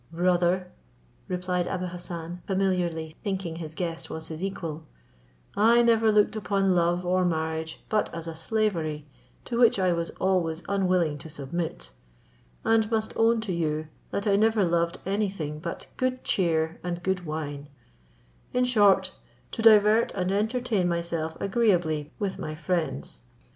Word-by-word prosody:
"Brother," 180 +1 +1 0.6
replied 180 -1 -1
Abou 185 -1 -2
Hassan, 175 -1 -6
familiarly 180 -5 0
thinking 190 -5 -3
his 160 -2 -7
guest 165 -2 -4
was 160 0 -6
his 160 +2 -6
equal, 165 -5 -4 0.7
"I 230 +3 +5
never 225 -2 +4
looked 210 +1 +3
upon 195 -2 +1
love 175 +1 +1
or 185 +1 +2
marriage 160 -1 -2
but 215 -1 0
as 165 -1 -6
a 165 - -4
slavery, 165 -4 -1 0.4
to 235 -1 -2
which 235 -4 +5
I 185 -2 +2
was 170 0 -2
always 175 -3 +1
unwilling 180 -6 +1
to 160 - -10
submit; 155 +3 -5 0.7
and 225 -1 +3
must 220 -1 -1
own 225 0 +3
to 215 -3 -3
you, 155 -2 -1 0.2
that 200 - -2
I 200 -2 +3
never 220 -1 +3
loved 170 0 +1
any 200 +2 0
thing 150 -6 -5
but 170 +1 -6
good 255 0 -1
cheer 165 -3 +1
and 175 0 -4
good 190 -1 0
wine; 145 -2 -5 0.8
in 250 - +2
short, 210 -6 +4 0.4
to 225 - -4
divert 215 0 +6
and 185 -1 0
entertain 215 -1 0
myself 170 -2 -2
agreeably 175 -8 +1
with 200 -3 -3
my 155 - -4
friends. 155 - -2
180 Hz, 150 wpm, -27 LUFS, 165-205 Hz, 0.8 s, divert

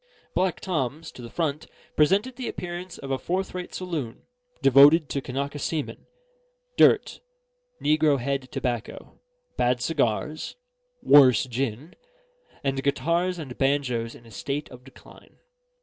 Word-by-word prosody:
Black 185 -3 0
Tom's, 160 -2 -3
to - - -12
the 120 - -8
front, 155 -1 -2 0.3
presented 200 +11 +3
the 250 -1 -5
appearance 175 0 -6
of 135 -1 -7
a 135 - 0
fourth 190 +2 -2
rate 180 -1 -6
saloon, 155 -10 -5 0.4
devoted 140 +3 +7
to 140 - -2
Kanaka 140 +3 -4
seamen, 155 +1 -4 0.7
dirt, 435 - +4 0.6
negrohead 140 -4 +1
tobacco, 120 -3 -4 0.4
bad 125 0 +2
cigars, 150 +2 -1 0.5
worse 130 -6 +7
gin, 130 +4 -4 0.7
and 135 -1 -1
guitars 170 +6 0
and 140 -7 -7
banjos 130 -4 0
in 120 - -16
a 115 - -15
state 140 +7 -4
of 125 0 -12
decline. 135 - -17
140 Hz, 125 wpm, -25 LUFS, 130-165 Hz, 0.7 s, devoted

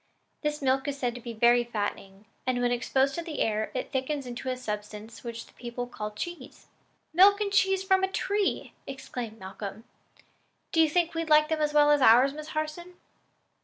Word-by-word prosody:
This 300 -1 -2
milk 265 +1 +1
is 285 -1 -2
said 245 -3 -1
to 245 - -9
be 235 0 -6
very 240 +2 +4
fattening; 205 -3 -5 0.2
and 255 -1 +1
when 245 0 +1
exposed 265 +3 +1
to 340 - -3
the 330 -3 -6
air, 215 0 0
it 255 - -3
thickens 270 +1 -2
into 245 +1 -5
a 255 - -2
substance 210 -1 -6
which 235 -1 -6
the - - -21
people 245 0 -5
call 215 -3 -6
cheese." 345 +12 -8 0.5
"Milk 395 +4 +6
and 410 -1 -1
cheese 385 -1 +3
from 380 0 +3
a - - +3
tree!" 405 0 -1
exclaimed 250 -4 -6
Malcolm. 195 +2 -8 0.9
"Do 325 - +4
you 320 - +4
think 340 +1 +1
we'd 330 -1 -3
like 305 0 +5
them 315 -1 0
as 300 0 +1
well 295 0 +6
as 295 -1 +4
ours, 255 +3 +6
Miss 305 +1 -8
Harson?" 310 +3 -4
265 Hz, 195 wpm, -28 LUFS, 235-315 Hz, 0.9 s, Milk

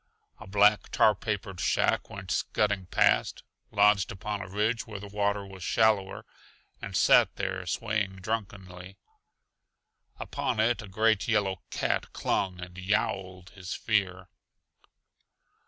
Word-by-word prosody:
A 105 - -11
black, 105 +2 +3
tar 110 - +4
papered 100 -2 -4
shack - - +1
went - - -7
scudding 105 -3 0
past, - - +2 0.3
lodged 100 -1 +3
upon 105 +2 -4
a 90 - -8
ridge 110 +4 -1
where 105 -2 -7
the 100 - -9
water 100 0 -1
was 95 -2 -10
shallower, 105 -3 +1 0.6
and - - -3
sat - - +5
there - - -4
swaying 105 -4 -1
drunkenly. 95 -2 -6 1.2
Upon - - -3
it 115 +2 +2
a 105 - -10
great 110 0 +1
yellow 100 -4 0
cat - - -2
clung 95 -2 -1
and 90 +1 -9
yowled 95 -1 -2
his 95 -2 -7
fear. 95 -4 -1
100 Hz, 125 wpm, -28 LUFS, 95-105 Hz, 1.2 s, sat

